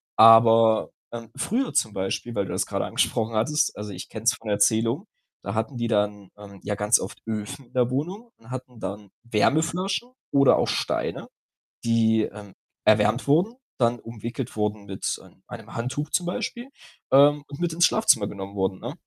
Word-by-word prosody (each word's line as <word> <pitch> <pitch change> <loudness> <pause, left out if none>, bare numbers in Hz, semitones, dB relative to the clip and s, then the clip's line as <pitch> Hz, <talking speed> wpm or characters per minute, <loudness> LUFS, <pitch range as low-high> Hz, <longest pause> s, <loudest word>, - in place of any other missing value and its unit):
Aber, 115 0 +7 0.2
ähm, 115 -1 -7
früher 245 +5 -1
zum 110 - +1
Beispiel, 95 +5 -3
weil 100 -2 -1
du - - -5
das - - 0
grade - - -2
angesprochen 110 0 -1
hattest, 150 +7 +1
also, 105 -1 -6
ich 90 - -8
kenne 110 -1 -8
es 115 - +4
von 110 -2 -8
Erzählung, 115 - +2 0.4
da 100 - -4
hatten 110 +3 -2
die 120 0 -1
dann, 105 -2 0
ähm, 100 -2 -12
ja 105 0 -2
ganz 105 +2 +3
oft - - -7
Öfen 110 +5 -5
in 120 - -27
der 125 -1 +2
Wohnung 190 - -4
und 115 - -18
hatten 125 -2 -7
dann 100 +1 -6
Wärmeflaschen 165 - 0 0.2
oder 140 -1 +5
auch - - +1
Steine, - - -2 0.6
die, 110 -1 +3
ähm, 100 -2 -8 0.3
erwärmt 110 +5 +3
wurden, 180 +11 +3 0.2
dann 120 -1 +1
umwickelt 115 +2 -6
wurden 105 -1 -2
mit, 95 -1 -3
ähm, - - -20
einem - - -10
Handtuch 135 +6 -3
zum 175 - +1
Beispiel, 240 +8 -4 0.4
ähm, 145 +2 +6
und 140 - -9
mit 175 -2 -1
ins 175 +2 +4
Schlafzimmer 115 - +3
genommen 100 0 -7
wurden, 95 -1 -1
ne? 120 +5 -6
115 Hz, 180 wpm, -25 LUFS, 105-140 Hz, 0.6 s, Aber